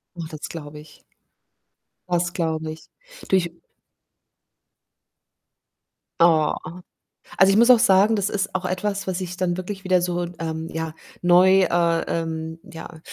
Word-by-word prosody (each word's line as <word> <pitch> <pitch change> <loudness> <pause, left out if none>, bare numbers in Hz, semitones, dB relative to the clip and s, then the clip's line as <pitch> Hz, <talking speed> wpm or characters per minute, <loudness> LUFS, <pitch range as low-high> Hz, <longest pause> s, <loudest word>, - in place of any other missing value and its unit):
Oh, 170 -2 -6
das 155 -2 -9
glaube 150 -2 -8
ich 150 0 -17 1.1
das 175 0 0
glaube 160 -3 -2
ich. 160 - -10 0.4
Du - - +1
ich 170 -2 0 2.7
Ah. 160 -3 +4 0.8
Also, 190 +1 +6
ich 200 - +3
muss 235 +2 +5
auch 245 -3 +8
sagen, 205 0 +4
das 200 -1 -1
ist 205 0 -2
auch 185 - -2
etwas, 195 +1 -2
was 185 0 -2
ich 180 0 -6
dann 175 -1 0
wirklich 195 +1 -6
wieder 185 -1 +3
so, 175 0 -1
ähm, 160 0 -4
ja, 160 -1 -4 0.3
neu, 185 +2 +5
äh, 170 -1 +1
ähm, 160 0 -4
ja, 160 -1 -11
175 Hz, 140 wpm, -23 LUFS, 160-190 Hz, 2.7 s, auch